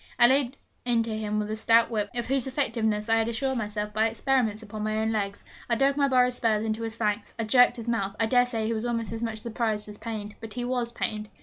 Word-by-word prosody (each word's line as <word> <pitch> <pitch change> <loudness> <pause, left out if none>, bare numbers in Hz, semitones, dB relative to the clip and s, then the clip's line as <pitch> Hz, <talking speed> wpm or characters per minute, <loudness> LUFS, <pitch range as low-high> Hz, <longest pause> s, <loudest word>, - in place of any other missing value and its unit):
I 240 - +8
laid 265 +1 +3 0.3
into 230 -2 +1
him 215 -1 -2
with 210 0 -2
a - - -1
stout 230 +1 +4
whip, 210 -2 -1
of 240 -1 -1
whose 265 +1 0
effectiveness 225 -6 0
I 225 0 +4
had 225 0 +1
assured 260 +2 -1
myself 210 -1 -3
by 220 +1 +3
experiments 225 -2 0
upon 215 0 -7
my 215 0 -1
own 220 0 0
legs. 200 -2 -2 0.3
I 235 - +3
dug 275 +3 +3
my 280 -1 +3
borrowed 250 -1 +3
spurs 220 -3 +1
into 220 0 -2
his 225 -1 -4
flanks. 210 -1 -2
I 225 - -1
jerked 245 +2 +5
his 230 0 -7
mouth. 200 -4 -1
I 225 - +3
dare 245 +2 +4
say 225 -3 -2
he 225 - 0
was 220 0 -3
almost 230 -2 -2
as 225 - -5
much 225 -2 -2
surprised 220 -2 -2
as 210 - -10
pained. 215 -2 -5
But 225 -2 -6
he 245 -1 -3
was 245 -1 -1
pained! 215 -2 -3
225 Hz, 250 wpm, -27 LUFS, 215-240 Hz, 0.3 s, I